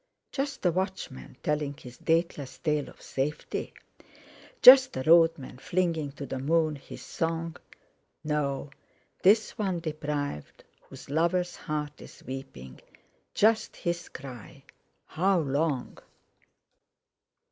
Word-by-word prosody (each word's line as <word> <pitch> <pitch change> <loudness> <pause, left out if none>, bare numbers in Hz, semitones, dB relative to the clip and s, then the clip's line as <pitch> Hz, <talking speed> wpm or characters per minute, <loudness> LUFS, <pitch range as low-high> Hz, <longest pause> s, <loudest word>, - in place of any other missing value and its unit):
Just 280 0 -3
the 180 - +4
watchman, 185 -9 -4
telling 150 -1 -1
his 125 -4 -12
dateless 160 -5 0
tale 150 -3 -1
of - - -17
safety? 145 +3 -3 0.9
Just 260 - +10
a 130 - -2
road 165 +1 +6
man, 130 -2 -10
flinging 165 -5 -1
to 140 - -7
the 135 - -4
moon 155 +2 +2
his 140 - -11
song? 165 0 -2 0.7
"No! 145 -2 -1 0.5
Tis 215 +3 +5
one 190 -5 -2
deprived, 150 - -4 0.3
whose 135 0 -11
lover's 170 +3 +1
heart 150 -2 -4
is - - -13
weeping, 130 - -8 0.5
Just 220 +1 +3
his 170 0 -3
cry: 125 -5 -10 0.4
'How 190 +3 +1
long?'" 140 -2 -1
155 Hz, 115 wpm, -28 LUFS, 140-170 Hz, 0.9 s, Just